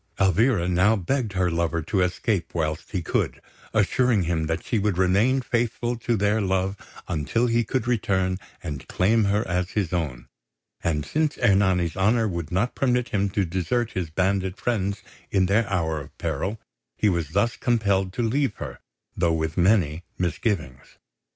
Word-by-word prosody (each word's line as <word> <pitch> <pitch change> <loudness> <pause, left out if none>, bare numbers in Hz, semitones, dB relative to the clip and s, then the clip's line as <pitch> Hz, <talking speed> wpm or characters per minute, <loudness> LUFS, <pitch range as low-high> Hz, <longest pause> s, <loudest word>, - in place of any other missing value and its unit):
Elvira 95 0 +3
now 95 +5 +4
begged 110 +3 -1
her 90 -2 +1
lover 85 0 0
to 95 +5 0
escape 90 0 -1
whilst 80 -1 -2
he 90 -4 -2
could, - - -1 0.3
assuring 110 0 +2
him 80 -2 -1
that 80 +1 -2
she 115 - 0
would 100 -3 0
remain 100 +9 +3
faithful 120 0 -1
to 120 0 -1
their 105 +2 +2
love 95 0 0 0.3
until 85 +9 0
he 120 0 +2
could 120 +1 -1
return 95 -6 0 0.2
and 75 -6 -6
claim 110 +3 +2
her 105 +2 +1
as 90 0 -1
his 95 -4 -2
own; 65 -9 -2 0.6
and 75 -3 0
since 155 -1 0
Ernani's 95 -7 +2
honour 110 +4 +2
would 85 -4 -4
not 95 +8 0
permit 125 -2 +1
him 100 -1 0
to 95 0 0
desert 95 +7 -1
his 90 -4 -3
bandit 95 +2 0
friends 100 -4 -1 0.3
in 95 -2 +2
their 100 +3 +2
hour 80 -5 0
of - - -13
peril, 105 +3 -2 0.4
he 110 - +2
was 85 -6 0
thus 115 +4 +2
compelled 100 -6 +1
to 120 - -1
leave 130 +1 +1
her, - - -7 0.4
though 85 -2 +2
with 80 -1 -1
many 90 -4 +2
misgivings. 85 - -2
95 Hz, 165 wpm, -25 LUFS, 85-110 Hz, 0.6 s, now